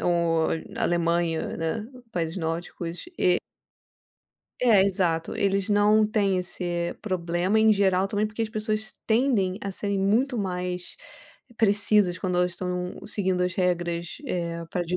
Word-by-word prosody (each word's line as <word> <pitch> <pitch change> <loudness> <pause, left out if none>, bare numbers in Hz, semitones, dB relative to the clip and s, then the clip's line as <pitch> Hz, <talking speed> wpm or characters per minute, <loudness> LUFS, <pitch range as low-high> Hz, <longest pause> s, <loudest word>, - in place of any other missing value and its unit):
ou 170 -2 +2 0.2
na - - -5
Alemanha, 170 -1 0
né, 165 +7 -2 0.3
países 165 0 -2
nórdicos 170 - -4
e 180 -1 +4 1.2
É 215 -6 +6
exato. 175 -4 0
Eles 195 0 +1
não 210 +1 +4
têm 200 -3 +1
esse 175 -1 -3
problema, 185 +1 0
em 220 0 +6
geral, 195 -1 +2
também 205 +1 0
porque 215 +2 -4
as 220 - -2
pessoas 215 0 -2
tendem 220 -5 +2
a 200 - -3
serem 200 0 -2
muito 235 +6 +2
mais 180 -2 -3 0.6
precisas 205 -3 +3
quando 180 -2 -1
elas 180 0 +2
estão 180 0 -3
seguindo 190 -3 0
as 180 0 0
regras, 175 -2 -1
eh, 170 -5 -3
para 180 - -1
di 175 +1 -2
185 Hz, 140 wpm, -26 LUFS, 175-205 Hz, 1.2 s, É